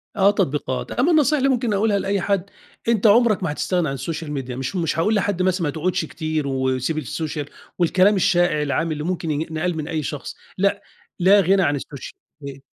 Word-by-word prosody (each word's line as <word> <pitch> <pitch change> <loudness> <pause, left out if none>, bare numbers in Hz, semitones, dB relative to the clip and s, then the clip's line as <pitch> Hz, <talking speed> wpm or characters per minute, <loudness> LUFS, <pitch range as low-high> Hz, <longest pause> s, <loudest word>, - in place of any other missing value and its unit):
آه 200 0 +5
تطبيقات. 145 -9 -2
أمّا 280 +8 +2
النصيحة 300 -1 +4
اللي 275 0 +2
ممكن 240 -4 0
أقولها 200 0 +2
لأي 195 -1 -1
حد، 200 0 -1 0.4
أنت 225 -2 +3
عُمرك 215 -2 +4
ما 155 - -1
هتستغنى 175 +1 -1
عن 135 - -2
السوشيال 150 +3 -5
ميديا. 130 -3 -4
مش 130 +8 -4
مش 165 -2 -1
هاقول 215 +6 +2
لحد 200 -2 0
مثلًا 185 -1 +1
ما 150 - 0
تقعدش 170 +3 -1
كتير 155 -2 -3
وسيب 130 +3 -1
السوشيال 150 0 -4 0.3
والكلام 185 +4 +4
الشائع، 175 -5 +2
العام 155 +3 -1
اللي 150 -1 -3
ممكن 170 -2 -2
ين 150 +1 -1
ينقال 160 +1 -2
من 155 -1 -4
أي 160 -3 -2
شخص 145 0 -5 0.2
لأ، 200 +1 +1 0.4
لا 195 +3 +6
غِنَى 190 +2 +3
عن 145 -3 +1
السوشيال 140 0 -8 0.3
مي 140 -1 -9
170 Hz, 195 wpm, -22 LUFS, 150-200 Hz, 0.4 s, لا